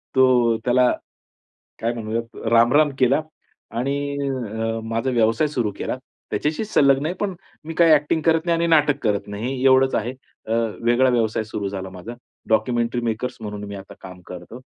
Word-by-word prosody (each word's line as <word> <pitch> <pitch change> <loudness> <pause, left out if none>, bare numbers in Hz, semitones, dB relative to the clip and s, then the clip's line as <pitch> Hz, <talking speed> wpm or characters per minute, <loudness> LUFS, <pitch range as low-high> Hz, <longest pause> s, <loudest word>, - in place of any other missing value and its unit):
तो 130 - +6 0.4
त्याला 125 0 +4 0.9
काय 115 +1 0
म्हणूयात, 115 0 -4 0.2
रामराम 130 +6 +5
केला 130 +3 +3 0.6
आणि 140 +3 0 0.2
अ, 115 -5 -2
माझा 115 +3 -1
व्यवसाय 115 +4 +2
सुरू 120 -7 -1
केला, - - -3 0.3
त्याच्याशी 155 +8 -1
संलग्न 140 -8 +3
आहे 175 - -2
पण 200 -3 -1 0.3
मी 165 +1 -6
काय 165 -2 +6
एक्टिंग 150 +2 +1
करत 165 +1 +2
नाही 170 - +3
आणि 170 - +1
नाटक 150 -3 +4
करत 105 -2 0
नाही 125 +6 -3
एवढंच 130 0 +5
आहे, 120 +4 -1 0.3
अ, 110 - -3 0.3
वेगळा 120 +2 +4
व्यवसाय 110 -2 0
सुरू 105 -2 -4
झाला 95 -1 -6
माझा 95 +6 -8 0.4
डॉक्युमेंटरी 120 +2 +1
मेकर्स 125 +3 -4
म्हणून 105 -1 -6
मी 100 0 -7
आता 95 0 -11
काम 90 0 -11
करतो. 90 +6 -9
120 Hz, 165 wpm, -22 LUFS, 110-140 Hz, 0.9 s, तो